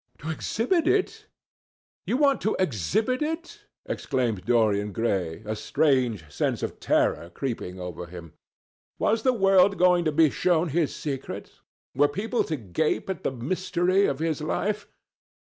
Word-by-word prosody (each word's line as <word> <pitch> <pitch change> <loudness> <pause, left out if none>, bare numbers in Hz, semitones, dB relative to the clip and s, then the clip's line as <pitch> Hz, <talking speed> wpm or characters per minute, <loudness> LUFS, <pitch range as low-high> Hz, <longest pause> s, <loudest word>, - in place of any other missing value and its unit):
"To 160 +2 -5
exhibit 285 - 0
it! 380 +1 0 0.8
You 250 - +1
want 280 -1 +3
to 215 - 0
exhibit 190 - 0
it?" 325 +3 -4 0.2
exclaimed 120 -8 -2
Dorian 105 -4 +2
Gray, 95 -8 -1
a 110 +1 -2
strange 120 - +1
sense 75 - -2
of - - -4
terror 85 - +1
creeping 95 -4 -5
over 90 -1 -6
him. 85 -2 -10 0.6
Was 220 +1 +1
the 255 - +3
world 195 -3 +4
going 180 -1 +4
to 155 - +2
be 155 -1 +4
shown 175 -2 +1
his 155 0 0
secret? 140 -3 -5 0.4
Were 145 +3 +4
people 220 +11 -1
to 160 - -2
gape 130 - -1
at 185 - -6
the - - 0
mystery 185 +8 +1
of 135 - -1
his 160 -1 -1
life? 205 +6 -2
155 Hz, 145 wpm, -26 LUFS, -, 0.8 s, world